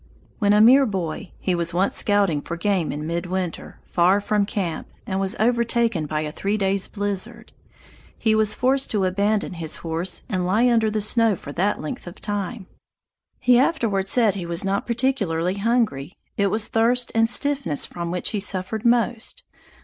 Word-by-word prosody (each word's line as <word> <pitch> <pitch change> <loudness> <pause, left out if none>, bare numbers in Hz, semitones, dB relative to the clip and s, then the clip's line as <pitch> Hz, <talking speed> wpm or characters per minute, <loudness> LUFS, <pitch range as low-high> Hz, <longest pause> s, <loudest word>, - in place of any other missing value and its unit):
When 205 -2 +3
a 210 +1 +5
mere 260 +4 +7
boy, 185 -2 -4
he 185 - -1
was 170 0 -1
once 190 +3 +1
scouting 200 -8 +2
for 170 - -6
game 190 -3 0
in 150 +1 -5
midwinter, 175 +1 -4
far 185 +3 +3
from 205 0 0
camp, 180 -7 -3 0.2
and 190 -1 -2
was 195 +3 -1
overtaken 235 -6 +1
by 150 0 -2
a 150 -1 -4
three 200 +6 -2
days' 195 -1 0
blizzard. 205 -2 -4 0.6
He 220 -1 +1
was 215 -1 +2
forced 265 +2 +1
to 200 -3 0
abandon 200 +2 0
his 165 -3 -4
horse 165 +3 -1
and 185 -7 -1
lie 210 +7 +2
under 225 -2 +3
the 215 0 -1
snow 225 0 +3
for 145 - -9
that 190 +7 0
length 155 +3 -6
of 175 - -10
time. 205 0 -4 0.7
He 250 -1 +4
afterward 230 - +1
said 225 -2 +3
he 180 -4 -5
was 170 +3 -3
not 195 +1 -1
particularly 200 -8 0
hungry; 210 - 0 0.2
it 200 - +2
was 215 +2 0
thirst 240 +2 +1
and 225 0 +3
stiffness 275 - 0
from 170 -1 -6
which 180 +1 -2
he 210 - -1
suffered 200 +2 -2
most. 240 - 0
200 Hz, 175 wpm, -23 LUFS, 180-225 Hz, 0.7 s, mere